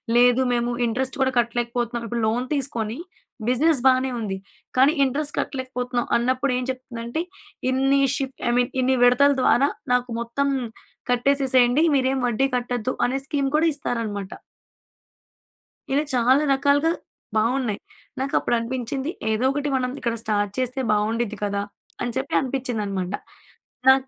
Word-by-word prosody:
లేదు 245 Hz, +1 st, +5 dB
మేము 240 Hz, 0 st, 0 dB
ఇంట్రెస్ట్ 260 Hz, +4 st, -2 dB
గూడా 265 Hz, 0 st, +3 dB
కట్టలేకపోతున్నాం 235 Hz, 0 st, -1 dB
ఇప్పుడు 235 Hz, +1 st, -2 dB
లోన్ 240 Hz, +3 st, 0 dB
తీసుకొని 235 Hz, -5 st, -2 dB, 0.5 s
బిజినెస్ 280 Hz, +4 st, +3 dB
బానే 260 Hz, 0 st, +4 dB
ఉంది, 200 Hz, -4 st, -3 dB, 0.4 s
కానీ 265 Hz, +3 st, +6 dB
ఇంట్రెస్ట్ 285 Hz, +3 st, +1 dB
కట్టలేకపోతున్నాం 250 Hz, -2 st, -2 dB
అన్నప్పుడు 255 Hz, +3 st, 0 dB
ఏం 250 Hz, -, -2 dB
చెప్తుందంటే 255 Hz, +1 st, -4 dB, 0.5 s
ఇన్ని 270 Hz, +1 st, +3 dB
షిఫ్ట్ 270 Hz, -1 st, -4 dB
ఐ -, -, +3 dB
మీన్ 245 Hz, 0 st, +1 dB
ఇన్ని 260 Hz, +1 st, +2 dB
విడతల 250 Hz, +4 st, +5 dB
ద్వారా 275 Hz, +2 st, +4 dB, 0.2 s
నాకు 250 Hz, 0 st, +1 dB
మొత్తం 235 Hz, +4 st, -1 dB, 0.6 s
కట్టేసేసేయండి, 260 Hz, +1 st, +3 dB
మీరేం 265 Hz, 0 st, +1 dB
వడ్డీ 245 Hz, +3 st, +1 dB
కట్టొద్దు 245 Hz, 0 st, -1 dB
అనే 265 Hz, +2 st, -1 dB
స్కీమ్ 275 Hz, -1 st, -1 dB
కూడా 320 Hz, -, +3 dB
ఇస్తారనమాట. 220 Hz, -8 st, -3 dB, 1.6 s
ఇలా 285 Hz, +2 st, +2 dB
చాలా 255 Hz, +4 st, +4 dB
రకాలుగా 285 Hz, +3 st, +3 dB, 0.5 s
బాగున్నాయి. 230 Hz, -1 st, +1 dB, 0.4 s
నాకప్పుడు 265 Hz, -2 st, +1 dB
అనిపించింది 260 Hz, +4 st, -3 dB, 0.2 s
ఏదోకటి 270 Hz, +6 st, 0 dB
మనం 250 Hz, -1 st, 0 dB
ఇక్కడ 235 Hz, -1 st, -1 dB
స్టార్ట్ 205 Hz, -2 st, 0 dB
చేస్తే 255 Hz, +1 st, -2 dB
బాగుండిద్ది 220 Hz, +1 st, 0 dB
కదా. 200 Hz, 0 st, -1 dB, 0.4 s
అని 245 Hz, -, -1 dB
చెప్పి 265 Hz, +1 st, -3 dB
అనిపించిందన్నమాట. 215 Hz, -8 st, -3 dB, 0.7 s
నా 265 Hz, -, +10 dB
250 Hz, 125 wpm, -23 LUFS, 235-270 Hz, 1.6 s, నా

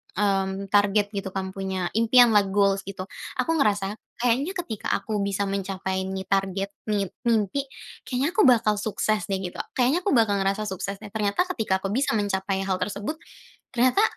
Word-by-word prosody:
mmm, 195 Hz, -1 st, 0 dB
target 205 Hz, 0 st, +3 dB
gitu 195 Hz, -2 st, -5 dB
kan, 190 Hz, 0 st, -2 dB
punya 190 Hz, -2 st, -3 dB
impian 235 Hz, +1 st, +6 dB
lah, 205 Hz, -2 st, +4 dB
goals 195 Hz, 0 st, +2 dB
gitu. 190 Hz, -1 st, -5 dB, 0.3 s
Aku 325 Hz, -2 st, 0 dB
ngerasa 205 Hz, -5 st, +2 dB, 0.2 s
kayaknya 250 Hz, +10 st, 0 dB
ketika 250 Hz, -, -4 dB
aku 215 Hz, -2 st, -2 dB
bisa 200 Hz, 0 st, 0 dB
mencapai 190 Hz, -1 st, -2 dB
nih 190 Hz, 0 st, -4 dB
target, 195 Hz, 0 st, 0 dB, 0.2 s
nit 200 Hz, -3 st, 0 dB, 0.2 s
mimpi. 230 Hz, +5 st, +1 dB, 0.4 s
Kayaknya 270 Hz, +6 st, 0 dB
aku 405 Hz, -, +3 dB
bakal 220 Hz, -4 st, +4 dB
sukses 215 Hz, 0 st, -1 dB
deh, 195 Hz, -, 0 dB
gitu. 180 Hz, -, -6 dB, 0.2 s
Kayaknya 260 Hz, +6 st, +3 dB
aku 365 Hz, -6 st, +1 dB
bakal 210 Hz, -4 st, +3 dB
ngerasa 195 Hz, +2 st, 0 dB
sukses 200 Hz, -1 st, -4 dB
deh. 205 Hz, -, -9 dB
Ternyata 210 Hz, -, +1 dB
ketika 190 Hz, -, -1 dB
aku 195 Hz, -, -2 dB
bisa 245 Hz, 0 st, +1 dB
mencapai 195 Hz, -1 st, -1 dB
hal 190 Hz, -1 st, -1 dB
tersebut, 210 Hz, +10 st, -3 dB, 0.5 s
ternyata 255 Hz, -, +3 dB
205 Hz, 170 wpm, -25 LUFS, 195-230 Hz, 0.5 s, impian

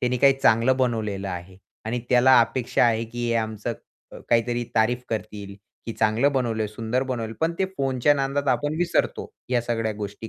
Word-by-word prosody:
त्याने 125 Hz, 0 st, 0 dB
काही 135 Hz, +2 st, +5 dB
चांगलं 120 Hz, +2 st, +4 dB
बनवलेलं 110 Hz, -6 st, -1 dB
आहे 90 Hz, +1 st, -7 dB, 0.3 s
आणि 120 Hz, +3 st, -2 dB
त्याला 130 Hz, +1 st, +6 dB
अपेक्षा 120 Hz, +1 st, +1 dB
आहे, 115 Hz, -1 st, +2 dB
की 120 Hz, +1 st, -3 dB
आमचं 110 Hz, 0 st, -2 dB
क -, -, -10 dB, 0.4 s
अ, -, -, -8 dB
काहीतरी 120 Hz, +1 st, +1 dB
तारीफ 120 Hz, +2 st, +2 dB
करतील, 100 Hz, -2 st, -5 dB, 0.3 s
"की 115 Hz, -, -3 dB
चांगलं 115 Hz, +7 st, +2 dB
बनवलं, 115 Hz, -5 st, -1 dB
सुंदर 115 Hz, +4 st, -2 dB
बनवलं." 120 Hz, -4 st, -4 dB
पण 165 Hz, +1 st, +1 dB
ते 190 Hz, -, +2 dB
फोनच्या 135 Hz, +1 st, +2 dB
नादात 140 Hz, 0 st, -1 dB
आपण 145 Hz, +4 st, 0 dB
विसरतो 175 Hz, -1 st, 0 dB, 0.3 s
ह्या 125 Hz, -2 st, +2 dB
सगळ्या 115 Hz, -2 st, -1 dB
गोष्टी 105 Hz, +1 st, -6 dB
120 Hz, 175 wpm, -24 LUFS, 110-130 Hz, 0.4 s, त्याला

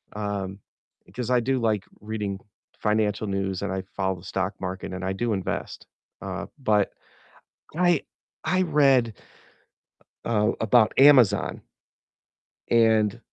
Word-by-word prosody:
um, 100 Hz, -2 st, -3 dB, 0.5 s
because 120 Hz, +4 st, -6 dB
I 125 Hz, -1 st, +4 dB
do, 130 Hz, +2 st, 0 dB
like, 110 Hz, -4 st, 0 dB, 0.2 s
reading 105 Hz, -2 st, -4 dB, 0.4 s
financial 105 Hz, 0 st, 0 dB
news 95 Hz, -1 st, -2 dB
and 100 Hz, -, -2 dB
I 95 Hz, 0 st, -3 dB
follow 95 Hz, -1 st, 0 dB
the -, -, -16 dB
stock 95 Hz, +2 st, -2 dB
market 95 Hz, 0 st, -5 dB
and 90 Hz, 0 st, -5 dB
I 95 Hz, -, -1 dB
do 115 Hz, +3 st, -1 dB
invest, 95 Hz, -2 st, -4 dB, 0.4 s
uh, -, -, -4 dB
but 105 Hz, -6 st, +2 dB, 0.9 s
I 175 Hz, -3 st, +3 dB, 0.4 s
I 185 Hz, 0 st, +2 dB
read 135 Hz, -, +3 dB, 1.1 s
uh, 110 Hz, -1 st, +2 dB
about 110 Hz, -1 st, +4 dB
Amazon. 135 Hz, -6 st, +5 dB, 1.1 s
And 110 Hz, -1 st, +3 dB
105 Hz, 120 wpm, -25 LUFS, 95-120 Hz, 1.1 s, Amazon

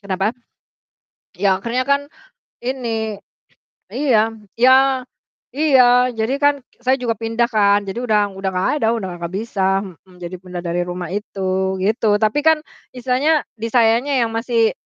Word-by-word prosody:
kenapa? 195 Hz, +2 st, -1 dB, 1.0 s
Iya, 190 Hz, -1 st, +1 dB
akhirnya 240 Hz, +4 st, -1 dB
kan 280 Hz, 0 st, +3 dB, 0.6 s
ini 230 Hz, -4 st, -3 dB, 0.8 s
iya 230 Hz, -6 st, +2 dB, 0.3 s
iya 255 Hz, +2 st, +7 dB, 0.8 s
iya, 285 Hz, -4 st, +5 dB, 0.4 s
jadi 220 Hz, +4 st, 0 dB
kan 285 Hz, 0 st, +5 dB, 0.3 s
saya 260 Hz, +1 st, +3 dB
juga 235 Hz, -2 st, -1 dB
pindah 230 Hz, +2 st, 0 dB
kan. 205 Hz, -1 st, +3 dB
Jadi 195 Hz, -, -4 dB
udah 210 Hz, -3 st, +1 dB
udah 195 Hz, 0 st, -2 dB
gak 180 Hz, +1 st, 0 dB
ada 225 Hz, -, +1 dB
udah 195 Hz, -5 st, -4 dB
gak 170 Hz, 0 st, -5 dB
bisa 195 Hz, -2 st, 0 dB
mhm, 185 Hz, 0 st, -14 dB
jadi 175 Hz, +1 st, -6 dB
pindah 180 Hz, -1 st, -7 dB
dari 175 Hz, +1 st, -1 dB
rumah 180 Hz, 0 st, -5 dB
itu 190 Hz, -2 st, -2 dB
gitu. 215 Hz, 0 st, +2 dB
Tapi 215 Hz, +6 st, +2 dB
kan 320 Hz, -1 st, +6 dB, 0.4 s
istilahnya 260 Hz, +5 st, +1 dB, 0.2 s
disayanya 230 Hz, +3 st, +2 dB
yang 230 Hz, -, +1 dB
masih, 230 Hz, -1 st, +1 dB
220 Hz, 140 wpm, -19 LUFS, 195-245 Hz, 1.0 s, iya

